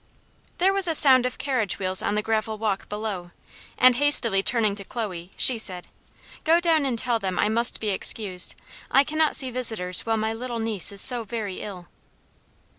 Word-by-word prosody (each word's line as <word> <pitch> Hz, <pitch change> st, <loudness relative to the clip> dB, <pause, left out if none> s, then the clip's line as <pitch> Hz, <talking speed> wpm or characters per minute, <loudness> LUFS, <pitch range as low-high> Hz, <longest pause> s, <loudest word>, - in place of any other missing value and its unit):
There 380 Hz, +2 st, +1 dB
was 390 Hz, -2 st, +3 dB
a 325 Hz, -, +1 dB
sound 260 Hz, -4 st, +6 dB
of 250 Hz, -, -9 dB
carriage 255 Hz, -7 st, -3 dB
wheels 185 Hz, -1 st, +1 dB
on 205 Hz, -, -3 dB
the 210 Hz, -, -3 dB
gravel 220 Hz, 0 st, -4 dB
walk 210 Hz, -3 st, -5 dB
below, 210 Hz, -4 st, -7 dB, 0.5 s
and 250 Hz, -1 st, +3 dB
hastily 245 Hz, -8 st, +4 dB
turning 215 Hz, -1 st, 0 dB
to 200 Hz, -, -7 dB
Chloe, 195 Hz, -6 st, -8 dB
she 245 Hz, -3 st, +4 dB
said, 180 Hz, -4 st, -4 dB, 0.5 s
"Go 330 Hz, +1 st, +2 dB
down 325 Hz, -5 st, -1 dB
and 245 Hz, -3 st, -4 dB
tell 240 Hz, -1 st, -1 dB
them 190 Hz, -3 st, -6 dB
I -, -, -1 dB
must 235 Hz, +2 st, +1 dB
be 215 Hz, -, -5 dB
excused. 190 Hz, -1 st, +1 dB, 0.3 s
I 275 Hz, -, +2 dB
cannot 310 Hz, +1 st, -2 dB
see 260 Hz, -2 st, +2 dB
visitors 220 Hz, -8 st, -1 dB
while 225 Hz, -1 st, -3 dB
my 220 Hz, +1 st, -4 dB
little 240 Hz, +1 st, -7 dB
niece 220 Hz, -5 st, +2 dB
is 200 Hz, -1 st, 0 dB
so 245 Hz, -3 st, +5 dB
very 210 Hz, -3 st, -7 dB
ill." 185 Hz, -4 st, -11 dB
225 Hz, 190 wpm, -22 LUFS, 200-255 Hz, 0.5 s, sound